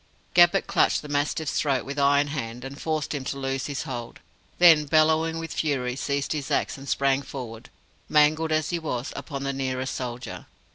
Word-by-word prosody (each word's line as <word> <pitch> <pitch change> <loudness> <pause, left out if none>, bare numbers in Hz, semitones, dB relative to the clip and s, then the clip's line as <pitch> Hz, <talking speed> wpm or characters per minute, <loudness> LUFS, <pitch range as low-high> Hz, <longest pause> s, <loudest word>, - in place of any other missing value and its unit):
Gabbett 175 -1 +5
clutched - - +2
the - - -8
mastiff's 145 +1 -1
throat 135 -5 0
with 140 +1 -4
iron 140 +1 +3
hand, 125 -3 -5
and 140 +2 -8
forced 155 -2 -2
him 140 -3 -3
to 140 - -3
loose 135 0 -2
his 140 -2 -3
hold; 120 -6 -6 0.4
then, 165 -4 +7
bellowing 160 +2 +3
with 165 -1 -5
fury, 130 -5 -1
seized 140 +1 -2
his 145 -3 -3
axe - - 0
and 135 -1 -9
sprang 135 0 +2
forward, 120 -4 -8 0.4
mangled 155 +1 +3
as 155 0 +1
he 170 - -1
was, 130 -6 -4
upon 140 -3 -5
the 140 0 -1
nearest 130 -1 -2
soldier. 125 0 -6
140 Hz, 185 wpm, -25 LUFS, 135-155 Hz, 0.4 s, then